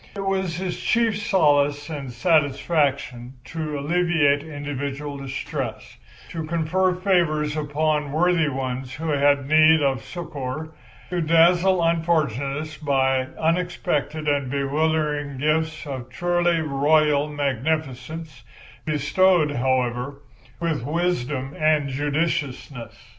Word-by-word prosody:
It 195 Hz, -1 st, -4 dB
was 190 Hz, -3 st, -1 dB
his 185 Hz, -1 st, -3 dB
chief 225 Hz, -3 st, +1 dB
solace 145 Hz, -7 st, +2 dB
and 140 Hz, -5 st, -6 dB
satisfaction 140 Hz, -3 st, 0 dB
to 155 Hz, -1 st, -4 dB
alleviate 150 Hz, -2 st, +2 dB
individual 145 Hz, -1 st, -5 dB
distress, 135 Hz, 0 st, -5 dB, 0.3 s
to 165 Hz, -, -5 dB
confer 170 Hz, +3 st, 0 dB
favours 170 Hz, -5 st, +1 dB
upon 150 Hz, -1 st, -1 dB
worthy 165 Hz, 0 st, +2 dB
ones 130 Hz, -1 st, -4 dB
who 160 Hz, +1 st, -4 dB
had 140 Hz, -1 st, +2 dB
need 155 Hz, +1 st, +5 dB
of 135 Hz, -5 st, 0 dB
succour, 155 Hz, -3 st, -6 dB, 0.4 s
to 180 Hz, -1 st, 0 dB
dazzle 175 Hz, +3 st, +4 dB
unfortunates 155 Hz, -3 st, 0 dB
by 135 Hz, -3 st, +1 dB
unexpected 160 Hz, -3 st, -1 dB
and 140 Hz, -3 st, +1 dB
bewildering 145 Hz, 0 st, -1 dB
gifts 155 Hz, +2 st, 0 dB
of 130 Hz, -3 st, -6 dB
truly 175 Hz, +3 st, +1 dB
royal 150 Hz, 0 st, +2 dB
magnificence, 145 Hz, 0 st, -3 dB, 0.4 s
bestowed, 155 Hz, +2 st, +2 dB
however, 130 Hz, +1 st, -1 dB, 0.4 s
with 165 Hz, -6 st, -1 dB
wisdom 145 Hz, -4 st, -1 dB
and 155 Hz, -2 st, +2 dB
judiciousness. 145 Hz, -3 st, -2 dB
150 Hz, 105 wpm, -23 LUFS, 140-165 Hz, 0.4 s, need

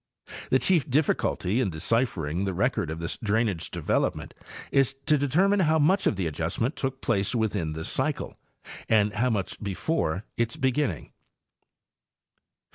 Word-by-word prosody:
The 130 Hz, -, +5 dB
chief 165 Hz, +1 st, +2 dB
difficulty 130 Hz, -, +1 dB
in 105 Hz, -, +1 dB
deciphering 90 Hz, -, -1 dB
the 95 Hz, -2 st, -2 dB
record 80 Hz, -, 0 dB
of 80 Hz, -, -4 dB
this 85 Hz, -, -3 dB
drainage 105 Hz, -5 st, 0 dB
development -, -, -1 dB, 0.4 s
is 135 Hz, -1 st, +2 dB
to 155 Hz, -, +4 dB
determine 175 Hz, +9 st, +2 dB
how 160 Hz, -3 st, +3 dB
much 175 Hz, +6 st, +3 dB
of -, -, +2 dB
the 95 Hz, -2 st, -2 dB
adjust 80 Hz, +1 st, -3 dB
ment 125 Hz, +7 st, 0 dB
took 135 Hz, 0 st, -3 dB
place 105 Hz, -1 st, 0 dB
within 100 Hz, -8 st, -1 dB
this 80 Hz, +1 st, -5 dB
cycle -, -, -1 dB, 0.5 s
and 105 Hz, -2 st, +3 dB
how 125 Hz, +4 st, +1 dB
much 100 Hz, -5 st, -2 dB
before 100 Hz, -, -1 dB
its 115 Hz, -1 st, 0 dB
beginning. 130 Hz, -, -1 dB
115 Hz, 145 wpm, -26 LUFS, 90-135 Hz, 0.5 s, The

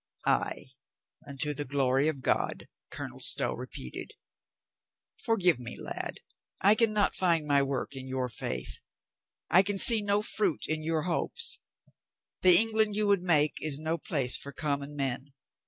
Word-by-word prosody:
"Ay, 130 Hz, -, -2 dB, 0.6 s
unto 140 Hz, +1 st, -2 dB
the 145 Hz, +1 st, -2 dB
glory 135 Hz, 0 st, 0 dB
of 140 Hz, -4 st, -4 dB
God," -, -, -2 dB, 0.2 s
Colonel -, -, -9 dB
Stow -, -, +4 dB
re -, -, -8 dB
peated. 65 Hz, -, -8 dB, 1.1 s
"Forgive 180 Hz, -, +2 dB
me, 120 Hz, -1 st, -8 dB
lad. -, -, -6 dB, 0.4 s
I 200 Hz, +2 st, +4 dB
can 225 Hz, 0 st, +1 dB
not 210 Hz, -1 st, 0 dB
find 170 Hz, -4 st, 0 dB
my 145 Hz, -1 st, +2 dB
work 135 Hz, 0 st, -4 dB
in 130 Hz, 0 st, -7 dB
your 130 Hz, -1 st, -3 dB
faith. 65 Hz, -, -4 dB, 0.7 s
I 185 Hz, -, +6 dB
can 195 Hz, +1 st, -3 dB
see 225 Hz, +2 st, +8 dB
no 205 Hz, 0 st, 0 dB
fruit 200 Hz, -7 st, -1 dB
in 155 Hz, 0 st, -3 dB
your 160 Hz, -1 st, -1 dB
hopes. 180 Hz, -, +3 dB, 0.8 s
The 180 Hz, -2 st, +8 dB
England 220 Hz, -1 st, +3 dB
you 210 Hz, 0 st, +1 dB
would 200 Hz, -2 st, +2 dB
make 155 Hz, -4 st, +1 dB
is 150 Hz, -3 st, +2 dB
no 160 Hz, +2 st, -4 dB
place 135 Hz, -5 st, +1 dB
for 140 Hz, -, -4 dB
com 140 Hz, 0 st, -3 dB
mon 140 Hz, +1 st, -10 dB
men. 135 Hz, 0 st, -4 dB
155 Hz, 160 wpm, -28 LUFS, 135-195 Hz, 1.1 s, see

